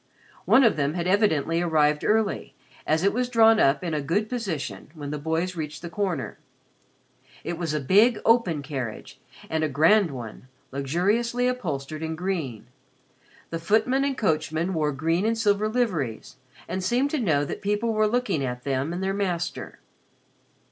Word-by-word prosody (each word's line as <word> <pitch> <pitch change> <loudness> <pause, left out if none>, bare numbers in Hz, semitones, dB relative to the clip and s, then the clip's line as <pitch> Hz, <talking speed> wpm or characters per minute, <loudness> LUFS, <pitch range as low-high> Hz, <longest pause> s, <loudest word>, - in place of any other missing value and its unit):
One 265 - +6
of 230 - +4
them 145 +2 0
had 170 -1 -2
evidently 170 -5 +2
arrived 150 -3 +2
early, 215 -1 0 0.3
as 160 +2 +2
it 200 - +3
was 250 +1 -1
drawn 225 -2 +5
up 140 +1 +3
in 170 -3 -2
a 150 - 0
good 200 +10 -1
position 200 - -4
when 145 -2 -6
the 150 - -3
boys 165 +4 -1
reached 155 -1 -6
the 170 - -6
corner. 180 -8 -3 1.0
It 175 - -3
was 165 -3 -3
a - - 0
big 210 - +4
open 205 -11 +3
carriage 130 -6 -6 0.3
and 160 0 -1
a 155 - +1
grand 165 +7 +4
one, 125 -2 -8 0.2
luxuriously 205 - 0
upholstered 155 - -3
in 160 0 -3
green. 160 - -3 0.9
The 165 - -3
footman 225 +9 +2
and 275 -2 -1
coachman 160 -1 0
wore 155 -3 0
green 165 +6 0
and 225 +1 +1
silver 210 -1 +2
liveries 180 - -2 0.3
and 185 +2 -3
seemed 250 +8 +1
to 310 - 0
know 155 - +1
that - - -6
people 210 +3 0
were 215 0 +2
looking 210 - 0
at 125 -1 -4
them 135 +3 -1
and 180 +2 -3
their 195 0 0
master. 180 -4 -3
175 Hz, 170 wpm, -25 LUFS, 150-215 Hz, 1.0 s, One